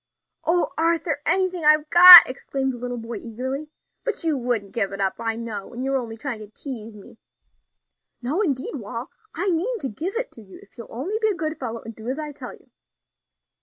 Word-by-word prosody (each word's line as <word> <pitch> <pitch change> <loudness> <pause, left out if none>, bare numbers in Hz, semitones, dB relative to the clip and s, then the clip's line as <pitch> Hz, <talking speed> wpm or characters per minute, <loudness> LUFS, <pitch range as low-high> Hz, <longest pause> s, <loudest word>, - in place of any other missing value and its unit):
"O 345 +1 +1
Arthur! 330 -3 0
anything 365 0 0
I've 305 0 +4
got," 355 0 +12
exclaimed 265 +1 -4
the 245 - -9
little 245 0 -5
boy 230 0 -6
eagerly. 260 +6 -6 0.3
"But 475 -7 -3
you 320 -2 +1
wouldn't 240 -6 -2
give 200 -4 -1
it 195 - -7
up, 195 -1 +1
I 225 -1 -2
know, 225 -4 -7
and 250 +2 -5
you're 270 0 -1
only 225 -2 -7
trying 240 -2 -5
to 215 - -10
tease 225 -1 -9
me." 205 +2 -15 1.0
"No, 275 - -2
indeed, 280 -10 -2
Wal; 230 +2 -7 0.2
I 375 +4 -1
mean 395 +9 -1
to 275 -10 -4
give 335 - -5
it - - -3
to 230 - -13
you 190 -3 -14
if - - -23
you'll 235 -2 -10
only 350 - -4
be 440 - +2
a 420 - 0
good 315 -1 -4
fellow 230 -3 -5
and 225 0 -10
do 220 +1 -11
as 260 +3 -3
I 305 -1 -5
tell 285 - -9
you." - - -26
265 Hz, 210 wpm, -23 LUFS, 230-330 Hz, 1.0 s, got